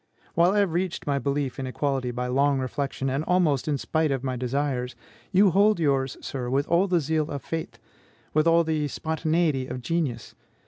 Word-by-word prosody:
While 175 Hz, +3 st, +4 dB
I -, -, +1 dB
have 190 Hz, -5 st, 0 dB
reached 180 Hz, 0 st, -2 dB
my 140 Hz, -1 st, 0 dB
belief 140 Hz, 0 st, -2 dB
in 130 Hz, -, -3 dB
equality 135 Hz, -1 st, -1 dB
by 125 Hz, +1 st, -3 dB
long 140 Hz, +3 st, +2 dB
reflection, 135 Hz, +1 st, -3 dB
and 135 Hz, +3 st, -1 dB
almost 165 Hz, -6 st, +2 dB
in 145 Hz, -2 st, +1 dB
spite 160 Hz, +3 st, 0 dB
of 135 Hz, -2 st, -1 dB
my 130 Hz, -1 st, -2 dB
desires, 125 Hz, 0 st, -2 dB, 0.4 s
you 195 Hz, 0 st, +5 dB
hold 205 Hz, +2 st, +4 dB
yours, 135 Hz, -4 st, +1 dB
sir, 125 Hz, -3 st, -4 dB
with 140 Hz, +2 st, 0 dB
all 175 Hz, +4 st, +3 dB
the 180 Hz, -2 st, +2 dB
zeal 155 Hz, 0 st, -1 dB
of 140 Hz, -2 st, -5 dB
faith, 165 Hz, -1 st, -5 dB, 0.6 s
with 155 Hz, +2 st, +3 dB
all 165 Hz, 0 st, +5 dB
the 155 Hz, -2 st, -1 dB
spontaneity 160 Hz, -2 st, 0 dB
of 125 Hz, 0 st, -5 dB
genius. 140 Hz, -8 st, -2 dB
145 Hz, 190 wpm, -26 LUFS, 130-165 Hz, 0.6 s, you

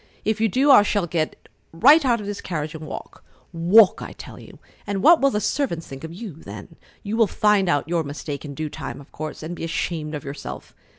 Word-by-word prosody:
If 220 Hz, 0 st, 0 dB
you 225 Hz, -, +4 dB
do, 270 Hz, +8 st, +3 dB
I 260 Hz, -, +9 dB
shall 205 Hz, -2 st, 0 dB
get 160 Hz, -2 st, -3 dB, 0.2 s
right 285 Hz, -, +6 dB
out 240 Hz, -3 st, +2 dB
of 210 Hz, -, -7 dB
this 205 Hz, 0 st, -5 dB
carriage 155 Hz, -3 st, -4 dB
and 155 Hz, -1 st, -8 dB
walk! -, -, -9 dB, 0.3 s
Walk, 180 Hz, +5 st, +5 dB
I -, -, -7 dB
tell -, -, -11 dB
you! -, -, -14 dB, 0.3 s
And 200 Hz, -1 st, -2 dB
what 335 Hz, -2 st, +7 dB
will 275 Hz, -, +5 dB
the 210 Hz, -, -1 dB
servants 210 Hz, -, -1 dB
think 135 Hz, 0 st, -10 dB
of 160 Hz, -, -6 dB
you 190 Hz, +1 st, -8 dB
then? 105 Hz, -, -11 dB, 0.3 s
You 205 Hz, +2 st, -3 dB
will 225 Hz, -2 st, +4 dB
find 205 Hz, -2 st, +2 dB
out 145 Hz, -1 st, +1 dB
your 170 Hz, -1 st, 0 dB
mistake 145 Hz, 0 st, -6 dB
in 145 Hz, -2 st, -8 dB
due 155 Hz, +1 st, -3 dB
time, -, -, -7 dB
of 140 Hz, -, -15 dB
course, 155 Hz, 0 st, -7 dB
and 170 Hz, +2 st, -5 dB
be -, -, -8 dB
ashamed 160 Hz, -2 st, -3 dB
of 150 Hz, -, -6 dB
yourself. 140 Hz, 0 st, -8 dB
170 Hz, 230 wpm, -23 LUFS, 155-215 Hz, 0.3 s, I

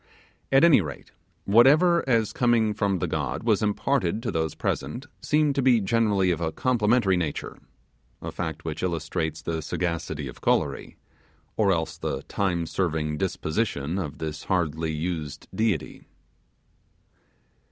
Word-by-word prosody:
At 135 Hz, +2 st, +5 dB
any 165 Hz, -10 st, +7 dB
rate, 75 Hz, -5 st, -8 dB, 0.3 s
whatever 150 Hz, -, +5 dB
as 115 Hz, -4 st, +2 dB
coming 115 Hz, -3 st, +2 dB
from 100 Hz, -2 st, 0 dB
the -, -, -1 dB
god -, -, -3 dB
was 110 Hz, -3 st, +2 dB
imparted 105 Hz, -1 st, 0 dB
to 120 Hz, -, -1 dB
those 80 Hz, -2 st, -1 dB
present 75 Hz, -, -3 dB, 0.2 s
seemed 150 Hz, -1 st, +2 dB
to 140 Hz, -, 0 dB
be 125 Hz, -3 st, +5 dB
generally 100 Hz, -3 st, +2 dB
of 85 Hz, -, -2 dB
a 80 Hz, -1 st, -1 dB
complimentary 115 Hz, -1 st, +2 dB
nature: 80 Hz, -4 st, -4 dB, 0.6 s
a -, -, -6 dB
fact 80 Hz, -1 st, -5 dB
which 80 Hz, -2 st, -4 dB
illustrates 80 Hz, -2 st, -2 dB
the 80 Hz, -1 st, -2 dB
sagacity 80 Hz, -4 st, -3 dB
of 65 Hz, -, -10 dB
Kolory, -, -, 0 dB, 0.6 s
or 105 Hz, -3 st, +3 dB
else 80 Hz, -3 st, -2 dB
the -, -, -3 dB
timeserving 85 Hz, -4 st, -1 dB
disposition 85 Hz, -3 st, -1 dB
of 75 Hz, -6 st, -5 dB
this 80 Hz, -1 st, -5 dB
hardly 80 Hz, -3 st, 0 dB
used 80 Hz, -2 st, -4 dB
deity. 110 Hz, -8 st, -1 dB
90 Hz, 135 wpm, -26 LUFS, 80-115 Hz, 0.6 s, any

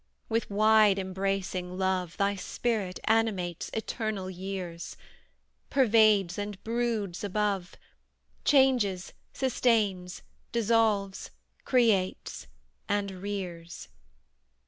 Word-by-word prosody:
With 230 Hz, 0 st, 0 dB
wide 215 Hz, -1 st, +5 dB
embracing 190 Hz, -1 st, -2 dB
love 185 Hz, -2 st, -1 dB
Thy 200 Hz, 0 st, +2 dB
spirit 200 Hz, -1 st, -2 dB
animates 210 Hz, -7 st, 0 dB
eternal 215 Hz, -3 st, -3 dB
years, 180 Hz, -2 st, -6 dB, 0.7 s
Pervades 215 Hz, -8 st, +4 dB
and 205 Hz, -1 st, -5 dB
broods 225 Hz, -6 st, -2 dB
above, 200 Hz, -2 st, -1 dB, 0.7 s
Changes, 250 Hz, -10 st, +3 dB, 0.2 s
sustains, 215 Hz, -8 st, 0 dB, 0.3 s
dissolves, 220 Hz, -4 st, +1 dB, 0.4 s
creates, 220 Hz, -7 st, +1 dB, 0.4 s
and 205 Hz, -1 st, 0 dB
rears. 180 Hz, -4 st, -6 dB
200 Hz, 80 wpm, -29 LUFS, 185-220 Hz, 0.7 s, wide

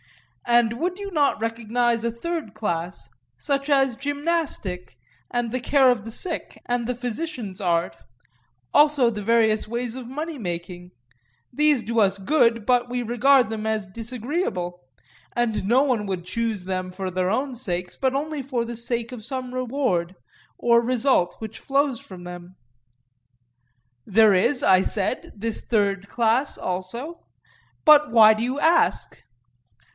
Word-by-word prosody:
And 240 Hz, -1 st, +4 dB
would 355 Hz, +3 st, -1 dB
you 400 Hz, -1 st, -6 dB
not 295 Hz, -, +2 dB
recognize 230 Hz, +1 st, 0 dB
a 235 Hz, -, 0 dB
third 290 Hz, -, -5 dB
class, 175 Hz, -, -3 dB, 0.3 s
such 275 Hz, -, -2 dB
as 270 Hz, -3 st, +3 dB
gymnastic, 285 Hz, -, -3 dB, 0.3 s
and 240 Hz, -2 st, -2 dB
the 255 Hz, -, -1 dB
care 265 Hz, 0 st, +4 dB
of 230 Hz, -4 st, -2 dB
the 225 Hz, -, -7 dB
sick, 335 Hz, +8 st, -4 dB
and 240 Hz, -1 st, -1 dB
the 250 Hz, -, -1 dB
physician's 245 Hz, -, -5 dB
art; 170 Hz, -2 st, 0 dB, 0.8 s
also 290 Hz, -5 st, +5 dB
the 210 Hz, -2 st, -5 dB
various 220 Hz, 0 st, +2 dB
ways 235 Hz, +1 st, -3 dB
of 250 Hz, -2 st, -8 dB
money 305 Hz, +2 st, -5 dB
making—these 175 Hz, -, -3 dB
do 230 Hz, +2 st, -1 dB
us 195 Hz, -2 st, +3 dB
good 230 Hz, 0 st, +2 dB
but 245 Hz, -1 st, +2 dB
we 245 Hz, 0 st, -2 dB
regard 245 Hz, +1 st, +3 dB
them 220 Hz, 0 st, -3 dB
as 220 Hz, -2 st, -1 dB
disagreeable; 225 Hz, -, -4 dB, 0.5 s
and 235 Hz, -5 st, 0 dB
no 250 Hz, +5 st, +4 dB
one 240 Hz, -7 st, 0 dB
would 185 Hz, -3 st, -4 dB
choose 220 Hz, -2 st, -2 dB
them 185 Hz, -1 st, -3 dB
for 185 Hz, 0 st, -5 dB
their 185 Hz, 0 st, 0 dB
own 260 Hz, +6 st, -1 dB
sakes, 180 Hz, -7 st, -4 dB
but 265 Hz, 0 st, 0 dB
only 300 Hz, +1 st, -2 dB
for 255 Hz, -3 st, -2 dB
the 235 Hz, 0 st, -6 dB
sake 235 Hz, 0 st, -3 dB
of 240 Hz, -4 st, -8 dB
some 255 Hz, +1 st, -5 dB
reward 250 Hz, -9 st, -1 dB, 0.4 s
or 235 Hz, -1 st, +4 dB
result 240 Hz, -6 st, +1 dB
which 220 Hz, 0 st, -8 dB
flows 275 Hz, -3 st, 0 dB
from 180 Hz, -2 st, -11 dB
them? 175 Hz, +1 st, -10 dB, 1.5 s
There 215 Hz, +1 st, +5 dB
is, 250 Hz, +9 st, +2 dB
I 185 Hz, -1 st, +5 dB
said, 200 Hz, +5 st, -2 dB
this 225 Hz, +2 st, -3 dB
third 200 Hz, -4 st, 0 dB
class 235 Hz, +4 st, +1 dB
also. 235 Hz, -, -5 dB, 0.6 s
But 300 Hz, -2 st, +7 dB
why 220 Hz, -2 st, +8 dB
do 215 Hz, -, -4 dB
you 255 Hz, +4 st, -1 dB
ask? 330 Hz, +3 st, +2 dB
235 Hz, 150 wpm, -24 LUFS, 200-260 Hz, 1.5 s, why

